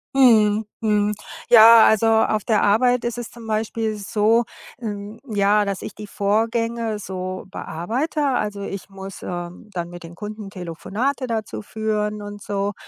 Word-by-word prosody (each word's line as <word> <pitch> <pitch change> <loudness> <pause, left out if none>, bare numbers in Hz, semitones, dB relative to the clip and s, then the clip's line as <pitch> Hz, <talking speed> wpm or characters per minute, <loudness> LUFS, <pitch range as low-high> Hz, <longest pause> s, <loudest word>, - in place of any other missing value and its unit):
Mhm, 220 -5 +5 0.2
mhm. 210 -1 +2 0.4
Ja, 230 -1 +9
also 220 +1 +3
auf 220 -2 +3
der 215 -2 +2
Arbeit 245 +4 +3
ist 240 0 -2
es 240 -2 -6
zum 235 -1 -11
Beispiel 220 0 -1
so, 215 +3 +2 0.4
ähm, 210 0 -6
ja, 210 -3 +2
dass 200 -2 -3
ich - - -7
die 215 - -8
Vorgänge 225 +2 0
so 185 -1 -5
bearbeite. 230 - -3
Also 210 -6 -1
ich 195 0 -6
muss, 195 0 -9
äh, - - -6
dann 175 +1 -6
mit 175 0 -10
den 170 +1 -10
Kunden 210 0 -7
Telefonate 195 - -3
dazu 215 - -3
führen 210 - -2
und 205 0 -8
so. 200 0 -2
210 Hz, 155 wpm, -22 LUFS, 200-225 Hz, 0.4 s, Ja